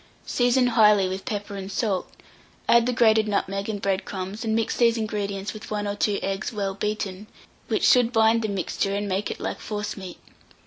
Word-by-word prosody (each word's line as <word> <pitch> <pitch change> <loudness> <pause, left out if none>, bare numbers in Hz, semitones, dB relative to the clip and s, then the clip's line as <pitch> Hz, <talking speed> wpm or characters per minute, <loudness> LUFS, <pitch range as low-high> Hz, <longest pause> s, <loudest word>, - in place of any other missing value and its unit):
Season 245 +1 +2
highly 210 -5 +5
with 190 +1 -5
pepper 205 -1 -4
and 195 0 -6
salt, 195 -2 -1 0.6
add 235 0 +5
the - - +2
grated 220 -3 +4
nutmeg 195 0 -1
and 205 -2 -4
bread 195 0 0
crumbs, 190 +4 -5
and 220 -1 0
mix 225 -1 0
these 235 -1 +3
ingredients 205 -2 -3
with 215 - -10
1 210 -1 -2
or 205 - -2
2 205 0 +1
eggs 195 +1 -2
well 200 -3 -2
beaten, 210 0 -3 0.4
which - - 0
should 245 -2 +5
bind 225 0 +4
the 220 - -1
mixture 195 +1 -1
and 205 0 -2
make 195 +2 -1
it - - -5
like - - -4
forcemeat. 210 -3 -5
210 Hz, 190 wpm, -25 LUFS, 195-225 Hz, 0.6 s, highly